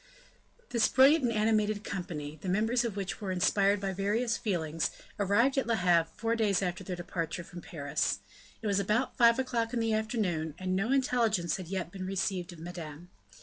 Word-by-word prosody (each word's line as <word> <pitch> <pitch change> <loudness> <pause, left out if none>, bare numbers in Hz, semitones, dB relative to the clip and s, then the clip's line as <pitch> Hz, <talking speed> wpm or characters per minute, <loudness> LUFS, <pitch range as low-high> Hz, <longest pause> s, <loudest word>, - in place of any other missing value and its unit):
This 235 -3 +3
brilliant 275 +3 +5
and 235 - +1
animated 215 -1 +1
company, 155 -5 -5
the 190 - -4
members 225 +6 +2
of 230 -4 -3
which 195 0 -4
were 195 -2 -2
inspired 195 +2 +3
by 195 -1 -2
various 215 +5 0
feelings, 165 -8 -1 0.3
arrived 235 +8 +3
at 270 - -2
Le 230 - +2
Havre 175 -4 +3
four 230 +2 0
days 205 -4 +2
after 180 +2 -2
their 180 0 -4
departure 175 -1 -4
from 175 +1 -10
Paris. 145 -5 -1 0.5
It - - -5
was 200 -1 +2
about 215 +6 0
five 235 -1 +5
o'clock 240 -3 -1
in - - +1
the 225 -1 +1
afternoon, 200 -9 -1
and 185 0 -2
no 210 +6 0
intelligence 235 -9 +1
had 185 -3 -7
yet 185 -2 -3
been 185 -1 -6
received 190 -2 -2
of 175 - -11
Madame. 170 -1 -8
195 Hz, 190 wpm, -30 LUFS, 175-225 Hz, 0.5 s, brilliant